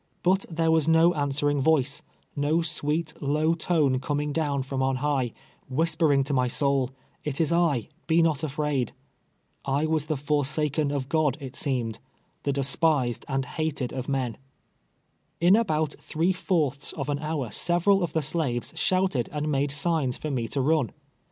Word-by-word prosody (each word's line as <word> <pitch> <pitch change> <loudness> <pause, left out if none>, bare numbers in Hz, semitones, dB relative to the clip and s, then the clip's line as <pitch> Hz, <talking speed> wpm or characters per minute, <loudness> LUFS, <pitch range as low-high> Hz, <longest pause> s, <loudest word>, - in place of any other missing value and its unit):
But 190 +2 +2
there 165 -1 +1
was 160 -2 +3
no 165 +2 +5
answering 145 -1 0
voice 150 -1 +2 0.2
— - - -40
no 150 +4 +1
sweet, 155 0 -2
low 155 +3 +2
tone, 155 -6 +1
coming 145 +2 -2
down 145 -4 0
from 135 0 -3
on 135 0 +1
high, 130 -3 0 0.4
whispering 150 0 +2
to 140 +2 -2
my 125 -2 +2
Boul, 140 -3 +2 0.2
" - - -38
It 145 -2 -3
is 165 -1 +2
I, 165 -9 +2 0.2
be 165 0 +4
not 155 -3 +1
afraid." 145 -4 -1 0.7
I 140 +3 +1
was 155 -1 0
the 155 - -1
forsaken 145 +1 0
of 140 -2 -2
God, 150 -2 +1
it 135 -2 -8
seemed 125 -7 -2 0.2
— - - -42
the 140 - +2
despised 140 -2 +1
and 135 -1 -1
hated 145 -3 -3
of 130 0 -4
men! 130 -4 -1 1.0
In 175 +4 +6
about 155 -9 +1
three 170 +4 0
fourths 150 -7 -1
of - - -4
an 145 -1 -1
hour 150 -6 -3
several 175 - +2
of 175 - -2
tho 160 - +1
slaves 145 -6 -1
shouted 185 -10 +1
and 150 0 -2
made 140 0 +1
signs 150 -3 0
for 155 - -4
me 120 -4 -1
to 135 - -1
run. 145 -5 +1
145 Hz, 170 wpm, -26 LUFS, 135-160 Hz, 1.0 s, In